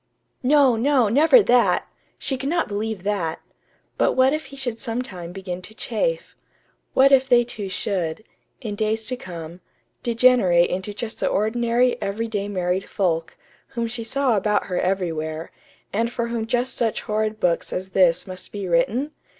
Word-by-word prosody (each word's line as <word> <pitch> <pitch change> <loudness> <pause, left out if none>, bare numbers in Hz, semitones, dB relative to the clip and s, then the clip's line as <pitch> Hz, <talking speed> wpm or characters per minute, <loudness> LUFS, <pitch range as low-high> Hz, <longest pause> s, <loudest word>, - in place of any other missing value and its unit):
No, 270 -2 +4
no, 250 -1 +3
never 320 - +6
that! 245 -5 +3 0.3
She 270 - -3
could 270 +2 -3
not 340 +1 +1
believe 210 -1 -3
that. 195 -6 -1 0.6
But - - +3
what 260 +1 +4
if 310 0 -3
he 275 - -12
should 245 -4 -4
sometime 225 -8 -5
begin 185 -1 -6
to 220 +4 -11
chafe? - - -2 0.6
What 275 +1 +6
if 265 -1 +4
they 240 -1 +6
two 215 -4 -6
should, 185 -1 -2 0.4
in 220 -5 -4
days 220 +1 -1
to 255 - -2
come, 175 -5 -9 0.4
degenerate 230 -8 +4
into 190 +3 -3
just 220 +2 -5
the - - 0
ordinary, 235 +3 +1
everyday 205 0 -2
married 185 -1 -2
folk, 165 -4 -1 0.4
whom 235 - 0
she 230 0 -4
saw 260 +1 +1
about 210 +1 +1
her 180 -2 -2
everywhere, 165 -4 -2 0.4
and 230 +3 0
for 235 -1 -2
whom 230 -1 -2
just 245 +2 -1
such 225 -2 0
horrid 215 0 -2
books 175 -4 0
as 185 +1 -4
this 180 -3 +3
must 185 -1 -6
be 200 -2 -5
written? 210 - +1
220 Hz, 165 wpm, -23 LUFS, 185-245 Hz, 0.6 s, never